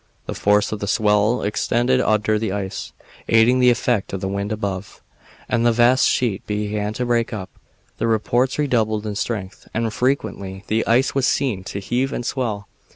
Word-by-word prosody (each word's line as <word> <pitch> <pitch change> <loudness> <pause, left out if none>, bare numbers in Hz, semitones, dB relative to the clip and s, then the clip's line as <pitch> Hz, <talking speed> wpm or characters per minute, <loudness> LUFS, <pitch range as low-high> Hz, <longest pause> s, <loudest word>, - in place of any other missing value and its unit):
The - - -4
force 105 0 +2
of 110 - -3
the 100 - -4
swell 105 +2 +2
extended 120 +5 +1
under 110 -1 +1
the 110 -3 -2
ice, 95 -1 -4 0.4
aiding 115 +3 +4
the 125 0 +6
effect 120 -4 0
of 95 - -2
the 95 - -3
wind 100 +2 -3
above, 100 -3 -4 0.5
and 120 -1 +1
the 120 - +4
vast 120 +3 +4
sheet 115 -6 0
began 105 0 -2
to 125 +3 -2
break 120 -1 +1
up. 95 -5 -6 0.5
The - - 0
reports 120 +4 +1
redoubled 110 -7 0
in 105 - -3
strength, 100 -2 -4
and 115 -1 -1
frequently 100 -8 -2
the 110 +1 0
ice 125 +4 +3
was 135 -1 +1
seen 120 -9 0
to 100 - -5
heave 125 +7 -1
and 120 - -4
swell. 110 -7 -2
110 Hz, 180 wpm, -21 LUFS, 105-120 Hz, 0.5 s, the